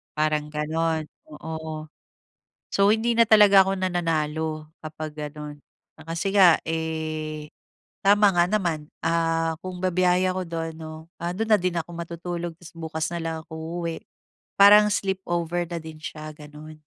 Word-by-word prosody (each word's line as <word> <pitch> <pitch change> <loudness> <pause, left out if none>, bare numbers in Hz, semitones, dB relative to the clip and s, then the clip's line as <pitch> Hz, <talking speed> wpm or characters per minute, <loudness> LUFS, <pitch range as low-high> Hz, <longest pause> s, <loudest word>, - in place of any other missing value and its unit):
parang 155 -1 0
gano'n, 160 +1 -1 0.2
oo. 160 0 -6 0.8
So, 200 +1 +3
hindi 225 +2 +2
na 230 -1 +4
talaga 205 -3 +8
ako 195 0 -1
nananalo 160 -4 -1 0.2
kapag 155 0 -6 0.2
ganun. 150 -1 -9 0.3
Kasi 165 +5 -4
nga 185 -5 +7
eh, 155 -1 -3 0.6
tama 205 0 +6
nga 175 -2 +3
naman, 175 -7 -1 0.2
ah, 165 -1 +1
kung 185 0 -7
bibiyahe 185 0 +2
ako 185 0 -3
do'n, 165 -1 -4
'no, 160 +1 -9
do'n 180 +6 -3
na 215 - +6
din 180 -1 -1
ako 170 0 -3
matutulog, 170 0 -5
tas 170 0 -14
bukas 160 -1 -4
na 170 - -3
lang 165 -1 -3
ako 160 +2 -6
uuwi, 165 -1 -3 0.6
parang 210 +1 +8
sleepover 175 -4 -1
na 170 - -3
din 160 -1 -9
siya, 155 0 -7
gano'n. 150 +1 -12
165 Hz, 140 wpm, -25 LUFS, 155-185 Hz, 0.8 s, talaga